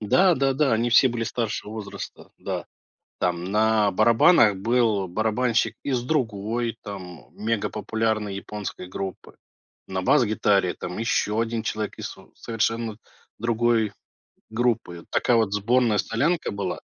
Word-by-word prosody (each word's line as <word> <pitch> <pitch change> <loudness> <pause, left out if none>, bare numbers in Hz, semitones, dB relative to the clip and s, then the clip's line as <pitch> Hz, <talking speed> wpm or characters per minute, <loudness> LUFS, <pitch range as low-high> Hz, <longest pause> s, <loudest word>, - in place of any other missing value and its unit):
Да-да-да, 135 - +3
они 115 +2 +1
все 130 +3 +6
были 115 -1 -2
старшего 110 -2 -3
возраста, 105 -2 -8
да, - - -4 0.6
там 90 -1 0
на 105 +1 +3
барабанах 110 - +5
был 110 -2 +1
барабанщик 110 +3 0
из 130 -4 -1
другой, 115 -4 -1
там, 90 -5 -8
мегапопулярной 110 -1 -1
японской 100 -1 -6
группы, 95 +1 -7 0.5
на 95 -1 -2
бас-гитаре 100 -3 +3
там 90 - -6
еще 110 -1 +1
1 115 -1 -2
человек 110 -1 -3
из - - -4
сов - - -13
совершенно 115 -1 -2 0.4
другой 115 -2 +1 0.6
группы, 110 -7 -1
такая 120 - +2
вот 110 -3 +1
сборная 115 +2 +2
солянка 150 +12 0
была. 100 0 -3
110 Hz, 120 wpm, -24 LUFS, 105-120 Hz, 0.6 s, все